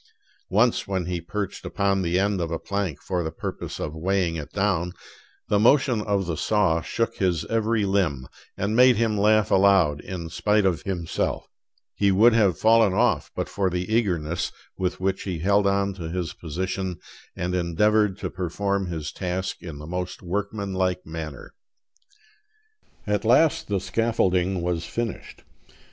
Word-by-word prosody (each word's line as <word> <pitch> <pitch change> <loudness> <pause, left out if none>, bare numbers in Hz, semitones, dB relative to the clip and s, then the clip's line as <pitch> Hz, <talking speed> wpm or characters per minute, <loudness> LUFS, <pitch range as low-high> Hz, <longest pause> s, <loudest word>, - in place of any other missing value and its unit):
Once, 110 +5 +2
when 95 -3 -1
he 90 -1 -3
perched 100 +3 -4
upon 100 -1 0
the 90 0 0
end 100 -1 +1
of 85 - -2
a 80 - -2
plank 95 -5 -3
for 90 +1 -2
the 80 - -2
purpose 80 - -6
of 75 - -4
weighing 90 +1 0
it 75 -3 -6
down, 95 -4 0 0.5
the 105 - +2
motion 125 0 +4
of 100 -2 0
the 85 -2 -2
saw 95 -2 +2
shook 115 +7 -2
his 85 -4 0
every 115 -1 +1
limb, 85 -10 0 0.3
and 105 +3 -1
made 125 +1 +7
him 110 0 +1
laugh 105 0 +3
aloud 95 -7 +4
in 90 -3 -6
spite 105 +5 +1
of 90 -4 +1
himself; 85 -4 -2 0.5
he 100 -1 +2
would 110 +5 +6
have 100 -7 +3
fallen 110 -3 +4
off 110 -8 +2
but - - -2
for 95 -2 0
the 90 +4 -3
eagerness 90 -6 0 0.2
with 90 -1 -2
which 95 +1 -1
he 90 -4 -3
held 100 +4 +2
on 100 0 +1
to 85 -4 -6
his 90 -1 -3
position 90 +2 -4 0.4
and 90 -1 -2
endeavored 95 +4 +2
to - - -4
perform 95 +2 -2
his 80 -3 -4
task 95 0 -3
in 80 -4 -8
the 75 - -9
most 90 +3 -5
workmanlike 95 -1 -2
manner. 80 -3 -7 1.5
At 105 0 0
last 160 +7 +3
the 100 -2 0
scaffolding 95 -4 0
was 85 -2 -1
finished. 115 -4 -5
95 Hz, 160 wpm, -24 LUFS, 85-105 Hz, 1.5 s, made